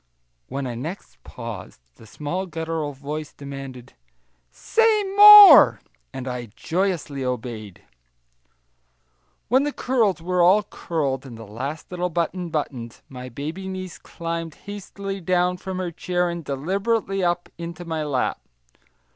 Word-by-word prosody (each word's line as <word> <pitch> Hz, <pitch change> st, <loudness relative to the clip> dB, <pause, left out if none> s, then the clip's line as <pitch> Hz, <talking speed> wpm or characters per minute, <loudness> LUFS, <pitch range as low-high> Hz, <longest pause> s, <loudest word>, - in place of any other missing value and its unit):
When 140 Hz, 0 st, -4 dB, 0.2 s
next 170 Hz, +8 st, -8 dB
I -, -, -15 dB
paused 115 Hz, -6 st, -8 dB, 0.2 s
the 110 Hz, -, -15 dB
small 170 Hz, -, -4 dB
guttural 160 Hz, -3 st, -3 dB
voice 145 Hz, +3 st, -6 dB
demanded, 135 Hz, -3 st, -9 dB, 0.6 s
"Say 440 Hz, -, +2 dB
more," 405 Hz, -, +10 dB, 0.3 s
and 130 Hz, -, -7 dB
I 125 Hz, -1 st, -4 dB
joyously 165 Hz, -6 st, -2 dB
obeyed. 115 Hz, -6 st, -5 dB, 1.6 s
When 260 Hz, +4 st, +4 dB
the 295 Hz, +1 st, -1 dB
curls 230 Hz, -10 st, 0 dB
were 180 Hz, +2 st, 0 dB
all 190 Hz, +5 st, +5 dB
curled 145 Hz, -9 st, -3 dB
and 120 Hz, -3 st, -10 dB
the 115 Hz, -, -10 dB
last 135 Hz, -, -6 dB
little 180 Hz, 0 st, -2 dB
button 175 Hz, +1 st, -2 dB
buttoned, 125 Hz, -7 st, -4 dB
my 125 Hz, -1 st, -8 dB
baby 155 Hz, +10 st, -6 dB
niece 185 Hz, -2 st, -6 dB
climbed 165 Hz, -1 st, -5 dB
hastily 200 Hz, -1 st, -6 dB
down 180 Hz, +1 st, +1 dB
from 190 Hz, 0 st, -6 dB
her 180 Hz, -2 st, -3 dB
chair, 175 Hz, +1 st, -1 dB
and 170 Hz, -1 st, -6 dB
deliberately 195 Hz, -, -1 dB
up 175 Hz, 0 st, 0 dB
into 170 Hz, +1 st, -7 dB
my 160 Hz, -2 st, -3 dB
lap. 145 Hz, -4 st, -1 dB
165 Hz, 130 wpm, -23 LUFS, 135-185 Hz, 1.6 s, more